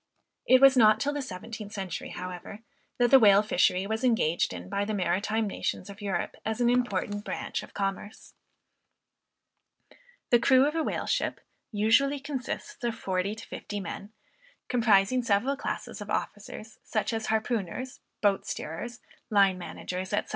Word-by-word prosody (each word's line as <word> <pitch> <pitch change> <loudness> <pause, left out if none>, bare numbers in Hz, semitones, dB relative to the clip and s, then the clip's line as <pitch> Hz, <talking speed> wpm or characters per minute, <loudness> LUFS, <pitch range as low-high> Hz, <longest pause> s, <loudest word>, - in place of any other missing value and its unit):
It 255 0 +6
was 270 -1 +8
not 215 -4 +6
till 290 +1 0
the 290 - -2
seventeenth 210 -2 -7
century 190 -4 -5
however, 180 +3 -7 0.4
that 240 -1 +3
the 270 - +9
whale 205 -2 +6
fishery 185 -2 +2
was 220 +4 -2
engaged 220 -10 +2
in 90 -1 -7
by 200 - -1
the 215 +1 -2
maritime 205 +4 0
nations 200 0 -3
of 200 +1 -13
Europe 195 -4 -2
as 220 +1 -2
an 240 0 +3
important 205 -4 0
branch - - -4
of - - -13
commerce. 200 +1 -4 2.0
The 240 - +6
crew 260 +3 +5
of 300 - 0
a 325 - 0
whale - - -2
ship - - -1 0.3
usually 230 +7 +3
consists 280 +6 -5
of 235 -2 -1
forty 190 +1 -2
to 225 - -10
fifty 205 - -6
men, 200 +1 -7 0.6
comprising 230 0 +3
several 235 +4 +1
classes - - -5
of - - -7
officers, 215 0 -5
such 215 +1 -1
as 225 -1 -2
harpooners, 220 +2 -2 0.2
boat 200 -1 +2
steerers, 235 +10 -5 0.3
line 195 -4 +4
managers, 180 +1 -5
&c. 205 - +1
215 Hz, 155 wpm, -28 LUFS, 195-245 Hz, 2.0 s, the